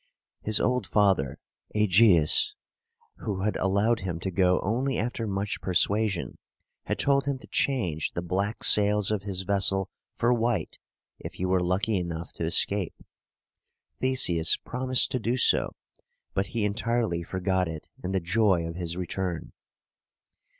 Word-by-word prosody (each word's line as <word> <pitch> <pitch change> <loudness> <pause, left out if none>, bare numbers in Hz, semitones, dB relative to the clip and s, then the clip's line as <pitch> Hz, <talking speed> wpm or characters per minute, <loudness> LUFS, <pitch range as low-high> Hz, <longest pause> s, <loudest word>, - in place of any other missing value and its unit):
His 110 0 0
old 125 0 0
father, 95 -11 +1 0.4
Ægeus, 105 - +4 0.6
who 100 -4 -4
had 105 +2 -1
allowed 100 +5 +1
him 90 -4 -4
to 95 - -3
go 90 0 +2
only 125 +7 -1
after 115 0 -3
much 100 0 -3
persuasion, 100 +1 0 0.5
had - - -2
told 140 0 +1
him 140 -1 -1
to - - -14
change 90 - -1
the 85 - -4
black 100 +5 -2
sails 105 0 +5
of 105 -2 -1
his 95 -2 -2
vessel 95 0 +1 0.2
for 120 +1 +2
white 120 -1 -1 0.4
if - - -8
he 90 - -4
were 95 0 +1
lucky 95 +4 +1
enough 85 -2 -5
to - - -6
escape. 95 +3 +1 1.0
Theseus 90 -11 +3
promised 130 0 +1
to 130 - -1
do 120 +3 -1
so, 120 - +2 0.6
but 95 0 -1
he 110 -1 -2
entirely 110 -3 -1
forgot 95 +1 -1
it 80 -2 -7 0.2
in 90 - -3
the 95 - +1
joy 95 -1 +1
of 85 - -5
his 85 0 -4
return. 90 -2 -4
100 Hz, 145 wpm, -27 LUFS, 90-115 Hz, 1.0 s, sails